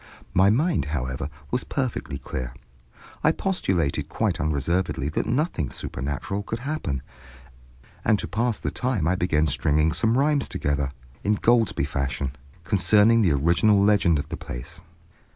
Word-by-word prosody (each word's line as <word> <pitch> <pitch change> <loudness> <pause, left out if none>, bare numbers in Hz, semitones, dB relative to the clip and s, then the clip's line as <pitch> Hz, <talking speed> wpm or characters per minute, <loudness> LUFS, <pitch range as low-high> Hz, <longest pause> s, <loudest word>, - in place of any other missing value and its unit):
My 95 +2 +5
mind, 155 - +2
however, 65 -3 -3 0.2
was 125 - 0
perfectly 130 - -3
clear. 65 -1 -5 0.7
I 160 - +5
postulated 95 - -1
quite - - -1
unreservedly 75 +1 0
that 75 - -2
nothing 125 - 0
supernatural 70 +10 -4
could 110 +3 -4
happen, 120 - -3 1.0
and 110 - +3
to - - -4
pass 115 +1 0
the - - -3
time 125 -11 0
I 90 - +3
began 85 -4 +1
stringing 75 +1 +2
some 110 +7 +2
rhymes 145 0 +2
together, 70 -1 -1 0.3
Ingoldsby 110 - +2
fashion, 70 -1 -2 0.3
concerning 105 +5 +4
the 90 -8 +3
original 85 +8 +3
legend 100 -5 +4
of 70 - -4
the - - -4
place. 80 +8 -8
90 Hz, 135 wpm, -25 LUFS, 70-115 Hz, 1.0 s, My